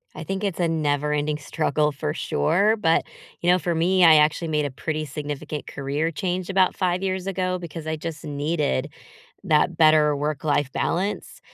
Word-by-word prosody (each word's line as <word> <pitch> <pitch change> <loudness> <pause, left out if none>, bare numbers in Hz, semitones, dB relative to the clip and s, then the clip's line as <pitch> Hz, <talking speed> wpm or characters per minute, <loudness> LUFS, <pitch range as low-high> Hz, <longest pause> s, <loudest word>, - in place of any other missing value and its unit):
I 155 - -6
think 195 +5 -4
it's 195 -3 -2
a 170 - +2
never-ending 150 -1 0
struggle, 150 0 0
for 135 - -3
sure, 200 - +1
but, 165 -4 +2 0.4
you 175 +1 +3
know, 180 - +4
for 170 -1 -1
me, 180 +3 +3
I 160 -1 +8
actually 155 +2 +3
made 150 -2 0
a 140 - -3
pretty 155 +3 -3
significant 145 +1 -6
career 145 +4 -2
change 180 +3 -3
about 190 -1 +2
5 180 0 0
years 190 0 -2
ago, 185 -1 -1
because 165 -2 -8
I 160 - -1
just 165 -1 -6
needed, 150 - -1 0.6
that 155 +2 +2
better 155 -2 +5
work-life 145 -1 -1
balance. 195 +4 -2
155 Hz, 170 wpm, -24 LUFS, 150-180 Hz, 0.6 s, I